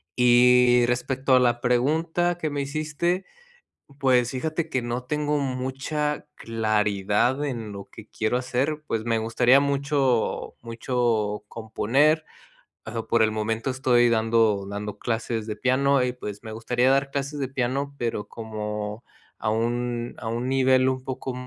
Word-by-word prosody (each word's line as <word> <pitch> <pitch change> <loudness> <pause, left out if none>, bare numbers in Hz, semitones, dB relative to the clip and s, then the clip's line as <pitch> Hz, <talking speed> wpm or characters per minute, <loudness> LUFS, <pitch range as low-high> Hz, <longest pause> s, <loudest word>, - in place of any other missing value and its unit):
Y 125 0 +5
respecto 130 +2 +1
a - - +6
la 120 -1 +2
pregunta 160 +8 +1
que 155 -3 -2
me 145 -1 -2
hiciste, 155 +6 -2 0.7
pues, 125 -3 +3
fíjate 155 +5 -2
que 130 -4 -1
no 120 +1 -4
tengo 150 +1 0
mucha 135 +3 -2
claridad 110 +3 0
en 115 -6 -4
lo 100 -1 -8
que 110 +1 -13
quiero 110 +2 -1
hacer, 135 +5 -2
pues, 110 0 -2
me 115 -1 +1
gustaría 120 +4 +4
mucho 140 -3 0
mucho 115 -3 -1
componer, 135 +8 +1 0.6
ah, 115 +1 -4
por 115 -1 +4
el 110 - +2
momento 110 +4 -2
estoy 125 -2 +3
dando 110 -3 +2
dando 105 0 -6
clases 115 -1 -2
de 105 - -3
piano, 135 +2 +2
y 125 0 -1
pues 105 -5 -8
me 110 - -7
gustaría 120 +3 +1
dar 135 +1 +2
clases 140 +1 -3
de 135 - -1
piano, 135 +2 -2
pero, 115 -4 -3
como 105 -1 -5 0.4
a 110 - -1
un 120 +1 -2
a 110 - -6
un 120 +2 -2
nivel 130 -1 +3
un 130 -1 -3
poco 130 0 -5
125 Hz, 150 wpm, -25 LUFS, 115-135 Hz, 0.7 s, a